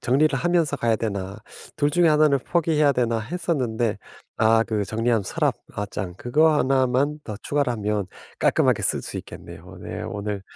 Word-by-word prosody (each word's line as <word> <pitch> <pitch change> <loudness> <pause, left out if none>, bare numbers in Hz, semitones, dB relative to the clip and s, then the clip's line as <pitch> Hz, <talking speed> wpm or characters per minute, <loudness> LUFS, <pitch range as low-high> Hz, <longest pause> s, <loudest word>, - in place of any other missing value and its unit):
정리를 135 +2 +2
하면서 170 -3 +1
가야 115 -3 +1
되나 100 -3 -3 0.4
둘 145 0 +1
중에 175 +1 +3
하나는 150 -2 +4
포기해야 155 -1 +2
되나 115 -3 0
했었는데 120 - -2 0.4
아 115 0 +4
그 105 -3 -2
정리함, 115 +2 0
서랍 - - 0 0.2
어 105 - -2
장 95 -3 -5
그거 150 +7 +3
하나만 135 +2 +1
더 105 -2 -6
추가를 145 -3 0
하면 105 -3 -2 0.3
깔끔하게 - - +2
쓸 - - 0
수 - - -7
있겠네요. - - -10
네. - - -6
오늘 100 -1 -4
125 Hz, 335 characters per minute, -23 LUFS, 110-150 Hz, 0.4 s, 하나는